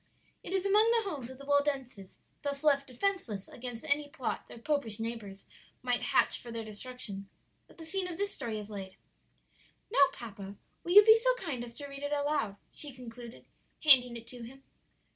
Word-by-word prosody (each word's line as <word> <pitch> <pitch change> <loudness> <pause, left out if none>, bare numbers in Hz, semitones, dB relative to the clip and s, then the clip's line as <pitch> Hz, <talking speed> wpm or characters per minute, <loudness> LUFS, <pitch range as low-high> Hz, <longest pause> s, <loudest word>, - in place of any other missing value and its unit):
"It - - -9
is 385 0 0
among 420 +3 +4
the 460 -3 +2
homes 265 -6 -6
of 260 - -10
the 280 - -12
Waldenses, 275 -8 -1 0.2
thus 280 0 -3
left 280 -2 +3
defenceless 255 - -2
against 245 +1 -7
any 290 -1 +1
plot 260 -3 -4
their - - -11
popish 235 -4 -1
neighbors 225 -4 -5 0.4
might 245 -1 0
hatch - - +3
for 240 - -10
their 230 -1 -4
destruction, 215 -3 -7 0.4
that - - -20
the 325 - -10
scene 370 +3 -1
of 345 -2 -6
this 405 +1 -1
story 225 -2 -4
is 210 0 -8
laid. 190 -2 -7 1.0
"Now, 280 -11 +6
papa, 200 -6 -9 0.3
will 350 - -1
you 415 +1 +10
be 440 0 +8
so - - +2
kind 305 - -5
as 235 -1 -10
to 285 - -7
read 275 0 -9
it 285 0 -3
aloud?" 285 -8 0 0.2
she 295 - -3
concluded, 240 -1 -11 0.4
handing 250 -5 +9
it 230 - -10
to 245 -1 -8
him. 265 +4 -11
260 Hz, 190 wpm, -31 LUFS, 230-300 Hz, 1.0 s, you